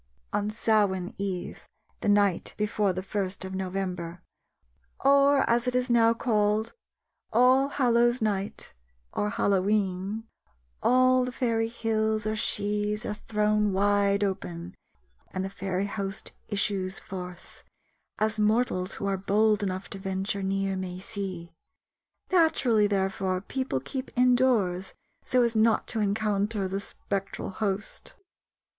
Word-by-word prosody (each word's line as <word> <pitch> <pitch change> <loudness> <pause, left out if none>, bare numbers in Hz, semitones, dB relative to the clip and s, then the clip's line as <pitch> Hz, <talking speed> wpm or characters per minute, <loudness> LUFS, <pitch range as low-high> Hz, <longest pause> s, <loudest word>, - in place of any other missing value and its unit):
On 205 0 0
Samain 205 -4 +1
eve, 190 -3 -4 0.3
the - - -1
night 205 -3 +2
before 210 -1 +1
the 185 +1 -4
first 195 -1 -3
of 190 - -6
November, 185 -2 -4 0.8
or, 280 0 +5
as 235 +1 +2
it 250 - 0
is 250 0 +1
now 230 -1 +5
called, 215 -2 +1 0.6
All 255 +4 +5
Hallows' 240 -2 +3
night 205 -3 -2 0.4
or 210 - 0
Hallowe'en, 200 +1 0 0.6
all 255 0 +4
the 250 - -3
fairy 230 -3 0
hills 220 -2 -1
or 215 0 0
shees 210 +1 0
are - - -2
thrown 210 -1 0
wide 200 +1 +2
open 180 -3 -4 0.6
and 185 0 -3
the 195 - -5
fairy 195 -1 -2
host 195 -1 -5 0.2
issues 195 -2 -1
forth, 180 -2 -9 0.6
as 215 0 0
mortals 210 -3 +1
who - - -5
are 195 -1 0
bold 210 +2 +2
enough 190 -1 -3
to 195 - -6
venture 195 +1 -2
near 195 0 -1
may 185 -1 -4
see. 185 -4 -6 0.8
Naturally 255 - +4
therefore 190 -2 0
people 260 - -2
keep 260 - -5
indoors 245 -8 +2 0.3
so 250 -1 +3
as 235 -1 0
not 220 0 +3
to 225 - -2
encounter 205 -1 0
the 195 +1 -3
spectral 195 -1 -4
host. 200 0 -4
205 Hz, 125 wpm, -27 LUFS, 190-225 Hz, 0.8 s, or